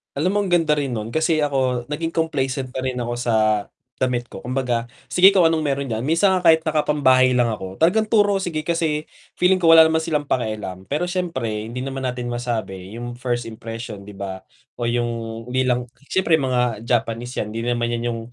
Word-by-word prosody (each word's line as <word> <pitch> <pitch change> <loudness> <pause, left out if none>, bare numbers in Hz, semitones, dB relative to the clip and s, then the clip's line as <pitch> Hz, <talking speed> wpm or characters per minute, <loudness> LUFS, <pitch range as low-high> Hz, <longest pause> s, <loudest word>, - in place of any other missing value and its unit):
Alam 170 +7 +1
mong 200 - -1
ganda 165 -4 +2
rin 135 -4 -2
nun 110 +1 -4
kasi 160 0 +1
ako 130 -2 -1
naging 165 +2 -2
complacent 135 -5 -1
na 130 - -4
rin 130 -1 -2
ako 120 0 -3
sa 120 -2 0 0.6
damit 125 -2 0
ko. - - -8
Kumbaga, 125 -2 -1 0.2
sige 185 +2 +7
kung 180 - +6
anong 160 -1 +1
meron 140 -1 -1
diyan. 110 +2 -2
Minsan 170 +5 +3
nga 180 - -1
kahit 160 0 +6
nakapambahay 145 -5 +3
lang 120 -1 +3
ako 95 -3 -6
talagang 215 +7 +3
turo 205 -3 +3
sige 160 -5 -3
kasi 160 -3 0 0.3
feeling 185 +1 +3
ko 165 -2 +5
wala 160 - +10
naman 160 0 +2
silang 155 -2 -1
pakialam, 105 -6 -3
pero 150 +5 -1
syempre 130 - -3
hindi 120 +2 -6
naman 135 -1 -4
natin 125 -1 -4
masabi 110 -5 -4
yung 120 0 -6
first 120 -1 -1
impression 115 -2 -7
'di 105 - -10
ba 95 -1 -5 0.4
o 120 - -5
yung 120 0 0 0.4
hindi 130 +1 0
lang 125 -1 0 0.2
syempre 185 -4 +3
mga 125 -6 0
Japanese 120 +1 -1
yan 105 - -2
'di 115 - -3
naman 120 0 0
'yan 120 0 -2
yung 115 - -4
130 Hz, 195 wpm, -22 LUFS, 120-160 Hz, 0.6 s, wala